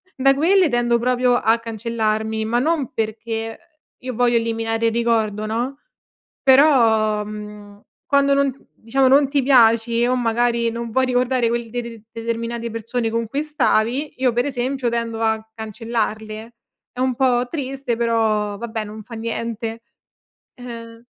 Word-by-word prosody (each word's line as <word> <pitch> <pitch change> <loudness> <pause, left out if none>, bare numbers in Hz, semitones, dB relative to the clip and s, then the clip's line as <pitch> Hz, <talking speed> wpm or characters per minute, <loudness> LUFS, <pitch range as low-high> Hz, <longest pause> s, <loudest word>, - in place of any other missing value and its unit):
da 275 +1 +4
quelle 350 +5 +3
tendo 240 -1 +2
proprio 250 0 +2
a 225 0 +2
cancellarmi, 220 -1 -2
ma 235 +2 +1
non 300 -2 0
perché, 225 +1 -3
uhm, - - -30 0.3
io 255 0 -5
voglio 240 0 +2
eliminare 225 0 -1
il - - +2
ricordo, 220 -2 0
no, 245 +5 -3 0.6
però, 230 -7 +4
mhmm, 210 -1 -10 0.2
quando 280 -2 +3
non 275 -1 0
diciamo 265 +4 +1
non 275 +1 +5
ti 280 -2 +1
piaci 235 -2 +4
o 250 - +2
magari 235 -1 +1
non 235 0 -5
vuoi 260 +2 +2
ricordare 250 -1 +1
quel 235 -1 -2
deter 235 -1 -6
determinate 230 0 -4
persone 230 +1 -2
con 230 0 -1
cui 280 +7 -2
stavi, 285 -2 0
io 255 -2 +1
per 245 +2 +1
esempio 260 -1 -1
tendo 230 -1 -2
a 220 0 0
cancellarle. 220 0 -4 0.4
È 250 - -11
un 260 0 +1
po' 245 -1 +2
triste 270 -5 -3
però, 220 -3 +1
vabbè 220 -1 -4
non 215 +1 -9
fa 235 - -12
niente. 230 0 -4 0.7
Uhm 230 -1 -10
235 Hz, 145 wpm, -21 LUFS, 225-255 Hz, 0.7 s, non